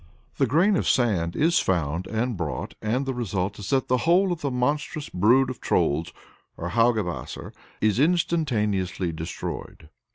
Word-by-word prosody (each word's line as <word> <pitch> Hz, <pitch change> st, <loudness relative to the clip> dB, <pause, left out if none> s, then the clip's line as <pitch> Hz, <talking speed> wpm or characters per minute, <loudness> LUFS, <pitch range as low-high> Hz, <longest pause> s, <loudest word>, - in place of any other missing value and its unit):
The 135 Hz, -, +2 dB
grain 175 Hz, -, +3 dB
of -, -, 0 dB
sand 95 Hz, -10 st, +1 dB
is 170 Hz, +3 st, +3 dB
found 85 Hz, -1 st, -1 dB
and 115 Hz, +2 st, -1 dB
brought, 80 Hz, -5 st, -4 dB
and 120 Hz, +6 st, 0 dB
the 135 Hz, -, -2 dB
result 100 Hz, -5 st, -2 dB
is 100 Hz, -, -6 dB
that 135 Hz, -1 st, +1 dB
the 125 Hz, -, +2 dB
whole 180 Hz, +7 st, +3 dB
of 170 Hz, -2 st, -3 dB
the 140 Hz, -, -1 dB
monstrous 145 Hz, +4 st, -1 dB
brood 120 Hz, +9 st, +3 dB
of 130 Hz, -, -10 dB
Trolls 80 Hz, +4 st, +1 dB, 0.5 s
or 85 Hz, -, -4 dB
Haugebasser 110 Hz, -4 st, 0 dB, 0.3 s
is 110 Hz, +1 st, +2 dB
instantaneously 115 Hz, -, +1 dB
destroyed. 80 Hz, -1 st, -6 dB
115 Hz, 155 wpm, -25 LUFS, 95-140 Hz, 0.5 s, grain